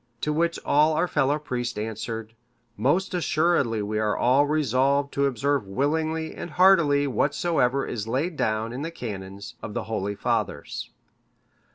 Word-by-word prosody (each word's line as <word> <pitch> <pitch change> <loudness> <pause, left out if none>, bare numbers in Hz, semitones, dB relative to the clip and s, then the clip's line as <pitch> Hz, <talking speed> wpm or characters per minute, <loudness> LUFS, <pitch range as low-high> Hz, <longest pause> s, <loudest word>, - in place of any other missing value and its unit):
To 150 - 0
which 170 +2 +1
all 150 +2 +4
our 180 - +1
fellow 145 -2 +1
priests 125 -6 -4
answered, 110 +1 -5 0.4
'Most 170 - +1
assuredly 155 - +1
we 105 +1 -2
are 105 -1 0
all 135 +4 +4
resolved 140 -1 +1
to 140 0 +2
observe 140 -3 0
willingly 160 +8 -1
and - - -7
heartily 165 -5 +4
whatsoever 140 +1 +1
is 110 -2 -4
laid 145 +9 -1
down 110 -2 -1
in 130 - -5
the 160 - -3
canons 100 - -7
of 105 - -7
the - - -1
holy 100 -2 -3
fathers. 100 - -2
140 Hz, 150 wpm, -25 LUFS, 110-155 Hz, 0.4 s, all